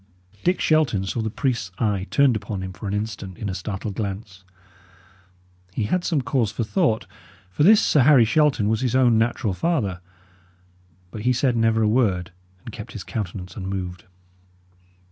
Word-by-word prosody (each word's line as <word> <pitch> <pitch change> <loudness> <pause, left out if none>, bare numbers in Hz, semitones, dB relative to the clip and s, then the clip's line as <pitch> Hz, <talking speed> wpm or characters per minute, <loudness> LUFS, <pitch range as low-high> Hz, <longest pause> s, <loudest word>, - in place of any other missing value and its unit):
Dick 180 +1 +2
Shelton 135 -12 +2
saw 115 +4 -2
the 110 - -2
priest's 115 -4 -2
eye 100 -3 -1
turned 140 -4 +4
upon 100 -2 -4
him 95 0 -6
for 95 +3 -7
an 100 - -2
instant 105 -3 -5
in 105 - -4
a - - -3
startled 95 +2 -5
glance. 100 -2 -5 1.3
He - - 0
had 175 - 0
some 155 -7 0
cause 115 -3 0
for 115 - -2
thought; 110 +1 0 0.5
for 95 - -3
this 205 +7 +7
Sir 145 - +3
Harry 130 -3 +6
Shelton 140 -4 +2
was 110 +1 +1
his 125 -1 0
own 120 -4 +4
natural 115 -3 0
father. 105 - -1 1.1
But 105 - -7
he 125 +3 +2
said 125 0 +1
never 115 -1 +2
a - - +3
word, 105 -7 +1 0.3
and - - -7
kept - - -9
his - - -6
countenance 95 -3 -5
unmoved. 95 -3 -5
110 Hz, 170 wpm, -23 LUFS, 95-125 Hz, 1.3 s, this